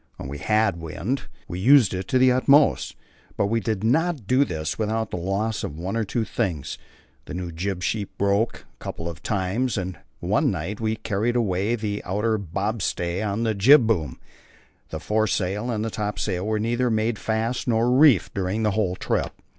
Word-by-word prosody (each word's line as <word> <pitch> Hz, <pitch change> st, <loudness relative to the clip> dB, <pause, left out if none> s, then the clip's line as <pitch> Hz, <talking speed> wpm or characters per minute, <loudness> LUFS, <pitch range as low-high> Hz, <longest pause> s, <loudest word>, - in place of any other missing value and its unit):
When -, -, -7 dB
we 70 Hz, +1 st, -6 dB
had 105 Hz, 0 st, +2 dB
wind, 95 Hz, -, -3 dB, 0.2 s
we 90 Hz, -1 st, -5 dB
used 125 Hz, 0 st, +6 dB
it 95 Hz, 0 st, -4 dB
to 130 Hz, -, +2 dB
the 130 Hz, 0 st, +5 dB
utmost; 140 Hz, +3 st, +3 dB, 0.4 s
but -, -, +2 dB
we 115 Hz, +3 st, +1 dB
did 110 Hz, -3 st, -2 dB
not 155 Hz, -, +1 dB
do 130 Hz, +6 st, +4 dB
this 80 Hz, -, -4 dB
without 110 Hz, 0 st, -1 dB
the -, -, -3 dB
loss 100 Hz, +5 st, -1 dB
of 75 Hz, -, -5 dB
one 90 Hz, +5 st, -3 dB
or 115 Hz, -, +1 dB
two 110 Hz, +2 st, -2 dB
things; 85 Hz, -, -3 dB, 0.5 s
the -, -, -7 dB
new 90 Hz, -1 st, -4 dB
jib 90 Hz, +2 st, -3 dB
sheet 105 Hz, -1 st, -2 dB
broke 100 Hz, +3 st, +1 dB
a -, -, -30 dB
couple 80 Hz, -, -5 dB
of 85 Hz, -3 st, -7 dB
times, 105 Hz, +5 st, -1 dB
and 90 Hz, -4 st, -4 dB, 0.2 s
one -, -, +1 dB
night 100 Hz, +8 st, -4 dB
we 110 Hz, 0 st, 0 dB
carried 110 Hz, +2 st, -1 dB
away 105 Hz, -1 st, +1 dB
the 105 Hz, -2 st, -3 dB
outer 105 Hz, +3 st, 0 dB
bobstay 95 Hz, -1 st, -2 dB
of 105 Hz, +1 st, -1 dB
the 110 Hz, -1 st, +1 dB
jib 120 Hz, +6 st, +6 dB
boom. 85 Hz, -, -1 dB, 0.7 s
The 80 Hz, -, -5 dB
foresail 105 Hz, +2 st, 0 dB
and 110 Hz, -1 st, -1 dB
topsail 105 Hz, -2 st, -2 dB
were 110 Hz, 0 st, 0 dB
neither 120 Hz, +3 st, 0 dB
made 110 Hz, -1 st, 0 dB
fast 115 Hz, +3 st, -1 dB
nor 115 Hz, +1 st, +2 dB
reefed 130 Hz, -, +5 dB
during 100 Hz, +3 st, -1 dB
the 105 Hz, -, +2 dB
whole 100 Hz, -3 st, 0 dB
trip. -, -, -1 dB
105 Hz, 185 wpm, -24 LUFS, 95-115 Hz, 0.7 s, used